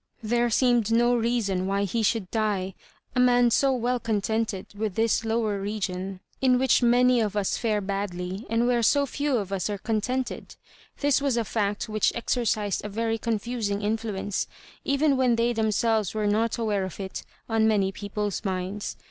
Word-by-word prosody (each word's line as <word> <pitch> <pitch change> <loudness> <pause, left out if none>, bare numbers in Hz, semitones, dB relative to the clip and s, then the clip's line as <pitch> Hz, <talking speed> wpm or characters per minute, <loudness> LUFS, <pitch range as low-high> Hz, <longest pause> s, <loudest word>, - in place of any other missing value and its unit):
There 240 +2 +1
seemed 240 -2 +2
no 240 +1 +4
reason 225 -6 0
why 200 +1 0
he 200 +4 -1
should 215 -3 0
die 205 -4 -1 0.2
— - - -35
a - - +2
man 245 -1 +5
who - - +6
was - - 0
so 275 -1 +3
well 250 0 0
contented 220 -2 -2
with 210 -2 -3
this 225 0 +2
lowo* 220 -3 -1
region 195 -2 -4 0.2
in 255 -1 +4
which 260 0 +3
many 245 +1 +4
of 210 -2 -1
us' 200 -2 0
fare 215 -3 0
badly, 195 0 -4
and 230 +1 +2
where 245 -1 +2
so 280 +5 +3
few 285 0 -1
of 200 -3 -3
us 195 +1 -1
are 205 - -2
contented. 240 +5 -3 0.5
This 285 -1 +3
was 275 -4 +1
a 230 - 0
fact 205 -1 -1
which 215 -1 +1
exercised 220 -4 -1
a 210 - -4
very 225 +2 -1
confusing 220 -2 -2
influence, 210 -2 -2 0.4
even 280 0 +2
when 250 -2 +3
they 235 +1 +1
themselves 220 -2 +1
were 215 -1 0
not 215 +2 +1
aware 210 -4 0
of 190 0 -6
it, 190 -1 -5 0.3
on 225 -1 +2
many 200 -3 +2
people's 205 0 -4
minds. 190 +1 -3
220 Hz, 180 wpm, -26 LUFS, 200-240 Hz, 0.5 s, who